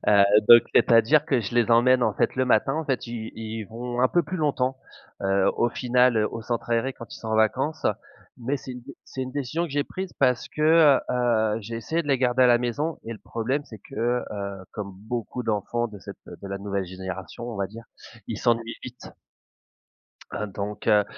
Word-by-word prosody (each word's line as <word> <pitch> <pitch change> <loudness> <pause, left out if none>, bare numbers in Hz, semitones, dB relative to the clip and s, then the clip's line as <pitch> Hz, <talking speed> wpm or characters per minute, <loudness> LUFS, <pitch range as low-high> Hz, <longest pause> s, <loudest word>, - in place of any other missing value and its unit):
Heu, 100 -1 +6 0.2
donc 120 0 +10
c'est-à-dire, 120 +7 +5
que 135 -6 +1
je 110 +3 -5
les 120 -1 +3
emmène 125 +2 +5
en - - +2
fait - - 0
le 130 - +2
matin, 135 +2 +2
en 160 0 -2
fait, 135 -4 -2
ils 115 -1 -6
ils 110 0 -5
vont 120 +3 -5
un 130 - +4
peu 175 - +2
plus 175 +5 -5
longtemps, 135 -4 0 0.5
heu, 95 0 +2
au 120 0 +2
final 125 -1 +2
au 115 - -6
centre 120 +1 -4
aéré 120 +3 +1
quand 115 - -10
ils - - -10
sont 110 - -7
en 110 - +1
vacances. 135 +8 +1 0.5
Mais 130 +4 -2
c'est 130 - -8
une 125 - -8
dé 140 +2 -11
c'est 130 - -6
une 130 - -5
décision 145 +4 -2
que 160 - -7
j'ai 145 0 0
prise 190 -1 -6
parce 125 -3 +2
que, 155 -2 +5
heu, 115 -3 +1
j'ai 115 +3 -6
essayé 160 +9 -2
de 145 - -9
les 135 -2 +3
garder 130 0 +2
à - - +7
la 120 -1 +5
maison 145 +7 -2
et 115 - -5
le 110 - -9
problème 130 +6 -2
c'est 110 - -12
que, - - -14 0.4
heu, 100 -2 -5
comme 100 -2 -6
beaucoup 115 +5 -5
d'enfants 115 +2 -1
de 105 -2 -11
cette - - -10
de 100 - -10
la 100 0 -4
nouvelle 100 -1 -3
génération 95 +3 -7
on 115 - -6
va 100 -1 -1
dire, 115 +4 -11 0.4
ils 110 - -4
s'ennuient 115 -1 0
vite. 125 -1 -9 1.2
Heu, 105 - -3
donc 100 +1 -6
heu, 105 -1 +5
120 Hz, 215 wpm, -25 LUFS, 110-130 Hz, 1.2 s, donc